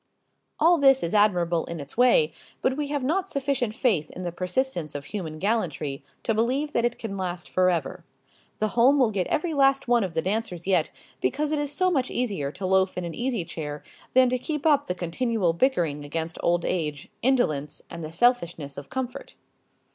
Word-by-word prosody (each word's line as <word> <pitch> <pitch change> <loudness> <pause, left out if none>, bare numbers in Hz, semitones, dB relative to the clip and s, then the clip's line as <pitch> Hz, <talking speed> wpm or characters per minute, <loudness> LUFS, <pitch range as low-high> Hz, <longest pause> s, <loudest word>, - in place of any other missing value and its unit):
All 335 +2 +5
this 270 -1 +5
is 170 - -1
admirable 175 -5 +3
in 170 -1 -6
its 140 0 -9
way, 255 - +5 0.3
but 260 - +2
we 295 0 -2
have 285 -2 -2
not 365 +8 0
sufficient 270 - -1
faith 185 - +1
in 185 - -8
the 175 - -3
persistence 180 - -2
of 145 0 -5
human 160 -3 -5
gallantry 160 -8 -1 0.2
to 225 - +1
believe 260 +7 0
that 235 - +1
it 240 0 0
can 200 -3 -5
last 180 -2 -4
forever. 180 -6 0 0.5
The 215 - 0
home 245 +6 +4
will 250 -5 +3
get 190 -3 -1
every 325 +1 -1
last 275 -2 +3
one 240 -2 +3
of 180 -4 -4
the 160 - +2
dancers 190 -3 -2
yet 180 -5 +2 0.3
because 295 - 0
it 305 - +1
is 290 -1 -2
so 370 +5 +1
much 265 -6 +1
easier 200 - -2
to 185 +5 -6
loaf 190 0 +2
in 180 - -2
an 170 - -5
easy 240 -7 -2
chair 150 -3 -6 0.3
than 260 0 +7
to 255 0 0
keep 300 +2 -4
up 295 -3 +4
the 180 - -2
continual 185 +1 0
bickering 170 - +1
against 160 +3 -4
old 175 0 +1
age, 150 -5 -2
indolence, 155 - +1
and 170 -1 -8
the 155 - -6
selfishness 170 - +1
of 140 - -12
comfort. 260 -1 -5
205 Hz, 195 wpm, -26 LUFS, 170-260 Hz, 0.5 s, than